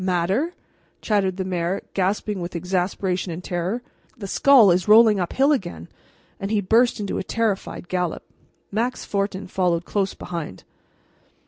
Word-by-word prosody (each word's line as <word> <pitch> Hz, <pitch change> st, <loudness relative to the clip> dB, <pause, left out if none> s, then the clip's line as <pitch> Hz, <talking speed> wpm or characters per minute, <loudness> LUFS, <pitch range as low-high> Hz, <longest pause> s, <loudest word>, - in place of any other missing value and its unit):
"Matter!" 190 Hz, -, 0 dB, 0.4 s
chattered 195 Hz, -4 st, 0 dB
the 190 Hz, -, -2 dB
mayor, 180 Hz, +1 st, -2 dB
gasping 200 Hz, +1 st, -1 dB
with 175 Hz, +1 st, -6 dB
exasperation 180 Hz, +1 st, -1 dB
and 170 Hz, +2 st, -6 dB
terror. 180 Hz, +8 st, -2 dB, 0.3 s
"The 210 Hz, -, -7 dB
skull 235 Hz, 0 st, +6 dB
is 175 Hz, 0 st, +1 dB
rolling 215 Hz, -1 st, +7 dB
up 175 Hz, -, -2 dB
hill 275 Hz, +3 st, +3 dB
again," 175 Hz, -, -3 dB, 0.5 s
and 195 Hz, -, -4 dB
he 215 Hz, -1 st, +1 dB
burst 225 Hz, +5 st, +3 dB
into 200 Hz, -2 st, -2 dB
a -, -, -3 dB
terrified 210 Hz, -4 st, -2 dB
gallop, 180 Hz, -2 st, -2 dB, 0.5 s
Max 235 Hz, +5 st, -2 dB
Fortin 200 Hz, -1 st, -2 dB
followed 180 Hz, -2 st, 0 dB
close 195 Hz, -2 st, -1 dB
behind. 165 Hz, -, -6 dB
190 Hz, 145 wpm, -23 LUFS, 180-215 Hz, 0.5 s, rolling